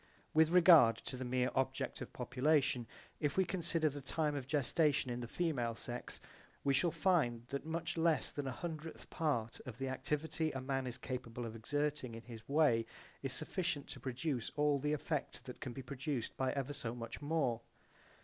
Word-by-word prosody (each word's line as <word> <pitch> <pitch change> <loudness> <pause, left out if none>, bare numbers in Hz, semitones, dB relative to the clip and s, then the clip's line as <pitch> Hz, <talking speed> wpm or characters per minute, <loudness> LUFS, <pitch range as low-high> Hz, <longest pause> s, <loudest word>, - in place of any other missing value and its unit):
With 160 0 +6
regard 165 -10 +8
to 130 - -7
the 130 - -4
mere 125 0 +1
object 130 0 -1
of - - -6
population, 130 -1 +2 0.3
if 145 +1 0
we 190 - +5
consider 170 -3 +1
the 145 -1 -3
time 150 +3 0
of 140 -3 -4
gestation 145 -1 +2
in 120 - -2
the 120 - -4
female 125 -8 0
sex 120 +2 -5 0.4
we 140 - +3
shall 145 +6 +3
find 155 -9 +2
that 140 +2 -3
much 165 +1 -2
less 160 -1 +3
than 145 -2 -3
a - - -1
hundredth 160 +3 -6
part 120 -8 0
of 120 -3 -6
the 135 0 -2
activity 150 +4 -1
a 135 - -2
man 135 0 -1
is 125 - -4
capable 125 -2 -4
of 115 0 -6
exerting 145 +1 -1
in 115 - -8
this 115 0 -10
way 140 -7 +4 0.3
is 135 - -2
sufficient 160 0 -1
to - - -6
produce 130 -1 -2
all 145 -1 +3
the 150 +2 0
effect 150 - -3
that - - -8
can - - -4
be 135 +2 -7
produced 135 -1 -3
by 130 -1 +1
ever 140 0 -2
so 120 -4 -4
much 115 +2 -6
more. 145 -6 +1
140 Hz, 190 wpm, -36 LUFS, 125-155 Hz, 0.4 s, regard